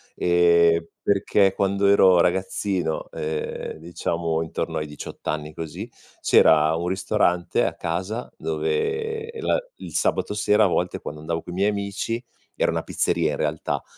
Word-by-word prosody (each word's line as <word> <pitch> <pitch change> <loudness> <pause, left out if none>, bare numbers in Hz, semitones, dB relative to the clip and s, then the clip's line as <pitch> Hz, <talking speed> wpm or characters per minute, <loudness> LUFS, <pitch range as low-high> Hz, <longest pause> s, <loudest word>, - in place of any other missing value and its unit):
ehm, 85 -1 +4 0.2
perché 100 -1 +2
quando 100 0 0
ero 95 -3 +6
ragazzino, 95 -2 -1
ehm, 75 0 -4
diciamo 85 0 -2
intorno 80 - -3
ai 75 - -2
18 75 - -9
anni 75 0 -3
così, 85 +9 -6 0.3
c'era 80 0 +5
un 85 +2 -2
ristorante 95 -2 +1
a - - -1
casa 95 +8 -3
dove 445 +1 -2
la 465 - +1 0.2
il - - -9
sabato - - 0
sera 105 +1 +3
a - - +5
volte 90 0 -1
quando 75 - -7
andavo 80 +2 -3
coi 90 - -9
miei 100 +3 +2
amici 105 +4 -3 0.3
era - - +1
una - - -2
pizzeria - - 0
in - - -3
realtà, 75 0 -2
90 Hz, 145 wpm, -24 LUFS, 80-100 Hz, 0.3 s, ero